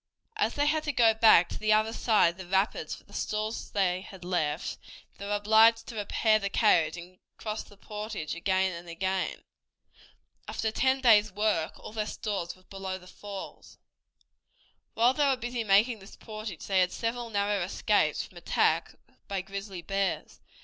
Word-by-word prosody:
As 425 - 0
they 290 - +2
had 310 +1 +2
to 295 - 0
go 230 -4 +5
back 220 -6 +6
to - - -6
the 215 0 +3
other 215 +1 +2
side 220 -7 +3
of 170 - -20
the 190 -2 -9
rapids 195 +3 0
for - - -17
the - - -20
stores 215 +1 -3
they 185 -2 0
had 190 -2 -11
left, 160 -3 -2 0.4
they 200 - -6
were 205 - 0
obliged 220 +2 +5
to 235 - -9
repair 215 +1 +2
the 200 -1 -2
carriage 175 -7 +3
and 180 +2 -11 0.2
cross 215 0 -4
the 205 - -16
portage 210 -5 -5
again 190 +2 +1
and 170 0 -9
again. 190 +2 -2 1.0
After 220 - -2
ten 265 +3 +1
days' 215 -4 +5
work 205 -5 0
all - - -10
their 215 -1 -2
stores 195 -6 -4
were 185 - -23
above 190 -1 -6
the - - -15
falls. 200 +1 -9 1.2
While 240 +3 +4
they 290 0 +2
were 270 -2 +2
busy 240 -1 -3
making 215 +3 +3
this 195 +1 -13
portage 215 -6 -8
they 195 -1 +2
had 180 0 +3
several 235 +1 -3
narrow 205 -1 0
escapes 175 +3 +1
from - - -14
attacks - - +1 0.3
by 195 -1 -2
grizzly 195 -1 -7
bears. 195 +2 -2
205 Hz, 175 wpm, -29 LUFS, 190-220 Hz, 1.2 s, back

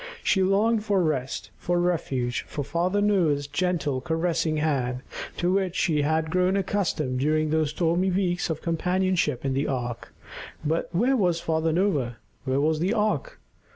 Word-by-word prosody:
She 190 - +3
longed 210 +4 +2
for 200 -4 +2
rest, 135 -5 -2
for 175 0 0
refuge, 140 -8 -1
for 145 - -4
Father 175 +7 0
Noah's 170 -9 +2
gentle, 145 -3 -1
caressing 165 0 0
hand 130 -5 -1 0.3
to 175 +1 +1
which 190 -2 0
she 155 -4 +2
had 160 +2 0
grown 185 +2 +2
accustomed 175 -9 -1
during 155 +2 +1
those 155 -1 +2
stormy 170 +4 +1
weeks 180 -2 0
of 160 -1 -3
companionship 175 -5 0
in 135 - 0
the 135 +2 0
ark. 120 -3 -4 0.5
But 160 +3 0
where 240 +10 +2
was 180 -7 +2
Father 160 0 0
Noah? 150 - 0 0.3
Where 130 +1 +1
was 155 +1 +1
the 180 +5 +1
ark? 215 - -1
165 Hz, 155 wpm, -26 LUFS, 145-185 Hz, 0.5 s, She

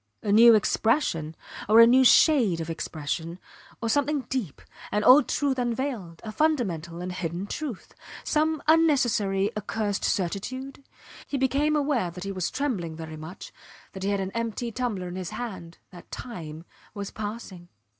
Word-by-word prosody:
A 205 - 0
new 230 +2 +8
expression 210 - +1 0.3
or 220 +2 +7
a 230 - +10
new 255 +3 +5
shade 245 - +5
of 165 0 -4
expression? 160 +1 -4 0.5
or - - 0
something 285 +4 +1
deep 235 - -3 0.3
an 210 0 0
old 260 +3 +7
truth 275 -3 0
unveiled, 240 -8 -3
a 215 - -5
fundamental 195 - -1
and 180 +1 -4
hidden 180 +1 -4
truth 255 -1 -6 0.3
some 310 -1 0
unnecessary, 240 -11 +3
accursed 210 -1 -2
certitude? 255 +10 -3 0.4
He 280 - -2
became 280 +3 +1
aware 280 -10 0
that 180 +2 -8
he 195 - -4
was 185 -3 -2
trembling 205 - -3
very 160 -1 -8
much, 160 +4 -10 0.4
that 190 - -9
he 195 - -1
had 200 -1 0
an 190 0 -3
empty 230 +1 -3
tumbler 215 -6 -3
in 175 - -7
his 185 -3 -5
hand 185 -8 -7
that 175 -2 -14
time 165 -9 -8 0.3
was 200 -1 -5
passing. 205 -5 -7
210 Hz, 155 wpm, -26 LUFS, 175-260 Hz, 0.5 s, a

